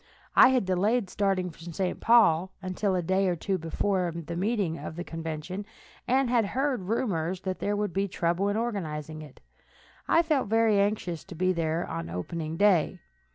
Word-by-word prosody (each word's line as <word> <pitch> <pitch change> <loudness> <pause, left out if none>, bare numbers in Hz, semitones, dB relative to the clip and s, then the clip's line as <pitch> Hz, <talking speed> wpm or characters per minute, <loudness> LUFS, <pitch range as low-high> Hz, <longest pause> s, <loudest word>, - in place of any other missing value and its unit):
I - - +9
had 255 -5 +2
delayed 195 +3 +1
starting 190 -3 0
for - - -20
St. 175 +2 -3
Paul 190 -7 +4
until 190 +1 -1
a 180 - 0
day 190 +3 +1
or 180 - +1
two 190 +3 -2
before 180 +2 -1
the 170 0 -6
meeting 190 -3 -1
of - - -7
the 175 - -4
convention, 165 +3 -5 0.4
and 260 +1 +3
having 235 -4 +2
heard 260 -8 -1
rumors 185 -6 -1
that 185 -1 -3
there 205 - -1
would 205 -3 -2
be 195 +1 0
trouble 175 +1 0
in 205 - 0
organizing 155 -9 -3
it, 150 -3 -13 0.7
I 335 - +4
felt 300 -8 +1
very 225 -1 +3
anxious 200 -5 -1
to 185 - -10
be 185 +2 +1
there 165 0 -1
on 85 0 -5
the 85 - -8
opening 155 - -4
day. 185 -3 +3
185 Hz, 185 wpm, -28 LUFS, 165-210 Hz, 0.7 s, I